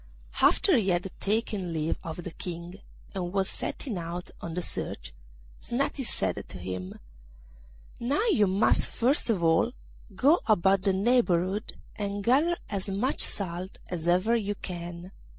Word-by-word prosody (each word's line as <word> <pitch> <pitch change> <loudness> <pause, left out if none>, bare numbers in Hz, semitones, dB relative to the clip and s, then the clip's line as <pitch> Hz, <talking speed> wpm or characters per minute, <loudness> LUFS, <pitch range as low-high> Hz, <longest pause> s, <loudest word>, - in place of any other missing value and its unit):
After 380 - +5
he 200 -4 +1
had 175 +1 0
taken 200 -4 -1
leave 160 0 -1
of 165 +1 -6
the 180 - -6
King, 175 +2 -6 0.3
and 180 -3 -3
was 195 0 +1
setting 225 -10 -3
out 170 +1 -5
on 165 -1 -5
the 180 - -1
search, - - -3 0.5
Snati 270 +2 -1
said - - -1
to - - -8
him, 90 0 -5 1.0
'Now 280 - +1
you 210 - +4
must 195 +4 +3
first 250 +1 +1
of 195 -7 +1
all 165 +9 +3 0.4
go 290 - +5
about 195 -2 +4
the 195 0 +2
neighbourhood, 195 -2 +2 0.2
and 200 -1 -3
gather 295 +9 +3
as 200 -1 -3
much 210 +8 0
salt 185 -1 -2
as 170 -2 -3
ever 185 +7 +3
you 205 -3 -1
can. 175 -1 -7
190 Hz, 150 wpm, -28 LUFS, 175-225 Hz, 1.0 s, After